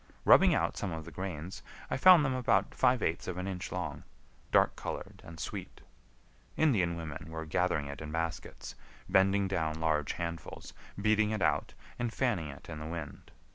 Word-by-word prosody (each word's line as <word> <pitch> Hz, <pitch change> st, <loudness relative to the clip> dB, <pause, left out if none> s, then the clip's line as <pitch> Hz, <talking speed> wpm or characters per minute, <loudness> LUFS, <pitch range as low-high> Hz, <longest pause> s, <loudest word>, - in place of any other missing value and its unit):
Rubbing -, -, +7 dB
out -, -, 0 dB
some 95 Hz, -, -2 dB
of 80 Hz, -1 st, -5 dB
the 85 Hz, -, -9 dB
grains, 90 Hz, 0 st, -5 dB, 0.3 s
I -, -, +1 dB
found 170 Hz, +1 st, +7 dB
them 135 Hz, -, +1 dB
about 130 Hz, -2 st, +1 dB
five 125 Hz, -2 st, +3 dB
eighths 80 Hz, -, -1 dB
of 90 Hz, -, -3 dB
an 90 Hz, -, -3 dB
inch 90 Hz, -2 st, -5 dB
long, 90 Hz, -5 st, -4 dB, 0.5 s
dark -, -, +4 dB
colored, -, -, -6 dB
and 85 Hz, -1 st, -11 dB
sweet. -, -, -6 dB, 0.8 s
Indian 100 Hz, -, +3 dB
women 80 Hz, -1 st, -7 dB
were 80 Hz, 0 st, -5 dB
gathering 80 Hz, -1 st, 0 dB
it 70 Hz, +1 st, -7 dB
in 75 Hz, -1 st, -6 dB
baskets, 80 Hz, +1 st, -4 dB, 0.3 s
bending 95 Hz, +1 st, +3 dB
down 80 Hz, -4 st, -1 dB
large 75 Hz, -3 st, +1 dB
handfuls, 85 Hz, -2 st, -6 dB, 0.3 s
beating 110 Hz, +1 st, +3 dB
it 110 Hz, -4 st, -1 dB
out, -, -, +1 dB, 0.2 s
and 120 Hz, -1 st, -1 dB
fanning 115 Hz, -, 0 dB
it 70 Hz, -, -10 dB
in 75 Hz, -, -6 dB
the 75 Hz, -, -6 dB
wind. 80 Hz, -4 st, -7 dB
85 Hz, 175 wpm, -31 LUFS, 80-100 Hz, 0.8 s, Rubbing